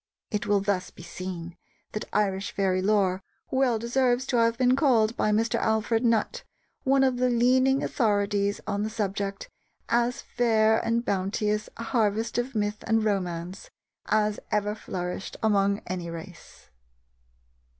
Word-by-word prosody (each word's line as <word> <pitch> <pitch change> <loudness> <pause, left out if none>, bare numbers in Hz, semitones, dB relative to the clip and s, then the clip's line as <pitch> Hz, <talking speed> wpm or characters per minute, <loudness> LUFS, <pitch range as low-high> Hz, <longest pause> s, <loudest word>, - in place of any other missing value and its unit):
It 210 0 -2
will 205 -1 +3
thus 195 -2 -1
be 170 - -14
seen 175 -1 -7 0.3
that 215 - -4
Irish 195 -2 0
Fairy 190 -2 +1
Lore 195 -2 +2 0.3
well 260 -3 +2
deserves 245 +2 +1
to 250 - 0
have 230 0 +3
been 255 0 +4
called 235 -6 +3
by - - +1
Mr. 225 +2 +1
Alfred 220 +1 +1
Nutt, 230 -2 +1 0.4
one 270 0 +3
of 260 -2 +2
the 250 0 +2
leading 255 +3 +3
authorities 205 -3 +1
on 205 -1 -2
the 215 - -1
subject, 200 - -3 0.4
"as 240 +1 +1
fair 220 -2 +2
and 230 +1 0
bounteous 210 +2 -1
a 230 - -5
harvest 225 0 0
of 245 +1 -3
myth 210 0 -1
and 225 -1 +2
romance 180 -2 -3 0.4
as 210 -1 +1
ever 210 0 0
flourished 180 -3 -5
among 200 -2 +2
any 180 -2 -4
race." 170 +1 -11
215 Hz, 145 wpm, -26 LUFS, 195-235 Hz, 0.4 s, been